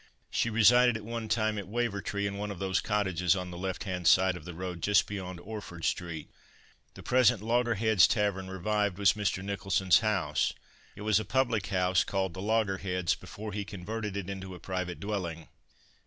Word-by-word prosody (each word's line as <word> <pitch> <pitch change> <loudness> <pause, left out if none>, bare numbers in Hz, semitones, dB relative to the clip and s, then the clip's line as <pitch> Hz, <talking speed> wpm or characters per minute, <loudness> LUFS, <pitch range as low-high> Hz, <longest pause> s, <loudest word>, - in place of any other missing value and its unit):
She 115 - +1
resided 120 +2 +5
at 105 - -10
one 115 0 -4
time 110 -1 +1
at 100 - -7
Wavertree, 100 -2 -2
in 100 0 -2
one 105 +1 -4
of 100 - -6
those 95 +1 0
cottages 95 -4 +1
on 90 -1 -4
the - - -7
left 95 +1 -3
hand 90 -3 -2
side 95 -1 +5
of 90 - -10
the 90 - -7
road 90 -1 -5
just 100 +3 +4
beyond 95 -3 -6
Orford 95 -4 -7
street. 85 -4 -2 0.7
The - - -11
present 125 -4 +3
"Loggerheads 115 -4 +3
Tavern 100 -4 0
Revived" 100 +1 -1
was 100 -2 +4
Mr. 100 -3 -1
Nicholson's 95 -2 +2
house. 95 -9 0 0.4
It - - -10
was 110 -1 +3
a - - -3
public 120 -6 0
house, 90 -1 +2
called 95 -3 -2
"The 95 - -7
Loggerheads" 95 -4 0
before 105 -1 -8
he 105 0 -2
converted 105 +1 -5
it 100 -3 -4
into 95 -1 -6
a - - -11
private 90 -2 -4
dwelling. 90 -6 -4
100 Hz, 185 wpm, -30 LUFS, 90-110 Hz, 0.7 s, resided